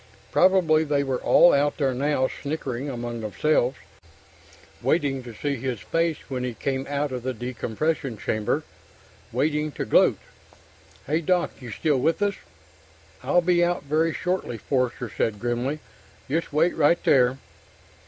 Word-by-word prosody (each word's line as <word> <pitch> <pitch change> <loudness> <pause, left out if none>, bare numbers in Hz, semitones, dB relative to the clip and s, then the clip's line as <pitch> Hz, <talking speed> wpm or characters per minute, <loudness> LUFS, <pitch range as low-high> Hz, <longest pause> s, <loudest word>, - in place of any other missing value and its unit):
Probably 175 -5 +4
they 145 -2 +1
were 130 -2 -1
all 175 - +6
out 145 +1 +2
there 135 -3 +1
now, 135 0 +1
snickering 140 -3 -3
among 120 -2 -5
themselves, 125 +4 +1 1.0
waiting 140 -5 +1
to 120 -1 -9
see 140 +4 -2
his 125 -2 -3
face 165 -1 0
when 130 -2 -3
he 125 -2 -3
came 135 +3 -2
out 145 0 -1
of 125 -1 -4
the 130 +1 -3
decompression 125 +2 -2
chamber... 110 +1 -1 0.7
waiting 150 0 0
to - - -3
gloat.... - - +4 0.9
"Hey 155 +4 0
Doc! 175 +2 +1
You 125 -3 -9
still 140 +6 0
with 160 +6 +1
us?" 205 0 +1 0.9
"I'll 175 - +3
be 175 0 +3
out 175 -3 0
very 155 +3 +1
shortly," 180 -9 -2
Forster 125 -1 -1
said 105 -2 0
grimly. 120 +5 -1 0.5
"Just 165 +5 -1
wait 160 +4 +2
right 160 +2 +3
there." 130 -1 +4
140 Hz, 145 wpm, -25 LUFS, 125-155 Hz, 1.0 s, all